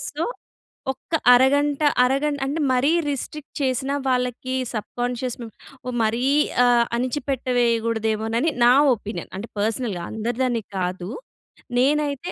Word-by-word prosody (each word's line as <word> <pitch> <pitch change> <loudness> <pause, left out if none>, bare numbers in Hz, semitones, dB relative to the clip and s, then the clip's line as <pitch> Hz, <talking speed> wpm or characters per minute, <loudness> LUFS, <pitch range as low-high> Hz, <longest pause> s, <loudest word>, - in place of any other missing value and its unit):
So, - - -1 0.7
ఒక్క 330 - -18 0.2
అరగంట 285 +3 +3 0.2
అరగంట 280 +3 +1
అంటే, 305 +4 -2
మరీ 260 +4 +3 0.2
రిస్ట్రిక్ట్ 285 +1 -5
చేసినా, 270 +1 0
వాళ్ళకి 250 +1 -1 0.2
సబ్ 215 - -4
కాన్షియస్‌ను, 245 -1 -3 0.4
ఒ - - -1
మరీ 230 +3 0 0.4
ఆహ్, 240 -1 +4
అణచిపెట్టవేయగూడదేమోనని 235 -2 0
నా 245 - +7 0.2
ఒపీనియన్. 210 +1 -7
అంటే, 220 +4 -7
పర్సనల్‌గా. 215 -4 -1
అందరిదని 235 +1 -1
కాదు. 180 0 -3 0.7
నేనైతే, 290 +4 +1
250 Hz, 105 wpm, -23 LUFS, 230-275 Hz, 0.7 s, నా